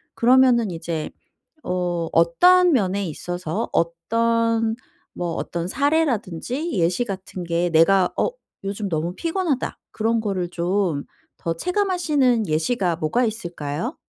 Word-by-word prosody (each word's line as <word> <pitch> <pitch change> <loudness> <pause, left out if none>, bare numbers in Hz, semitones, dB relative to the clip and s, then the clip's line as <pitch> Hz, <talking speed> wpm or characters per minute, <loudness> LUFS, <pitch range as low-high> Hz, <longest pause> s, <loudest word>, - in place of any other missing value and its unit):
그러면은 245 -4 +4
이제 165 -2 -4 0.5
어 175 -2 -2
어떤 355 - +5
면에 200 -4 +1
있어서 175 +1 -4
어떤 230 +6 +1 0.4
뭐 175 -2 -3
어떤 170 0 -3
사례라든지 280 - 0
예시 175 +7 +1
같은 190 -3 -6
게 170 +1 0
'내가 180 +3 +4
어 - - +2 0.4
요즘 200 +1 -3
너무 165 +2 -2
피곤하다.' 330 -5 -1
그런 225 +1 0
거를 190 -4 -2
좀 175 -4 -1 0.4
더 165 0 -1
체감하시는 310 - +1
예시가 165 +2 0
뭐가 235 +11 +1
있을까요? 175 - -4
195 Hz, 255 characters per minute, -22 LUFS, 170-245 Hz, 0.5 s, 어떤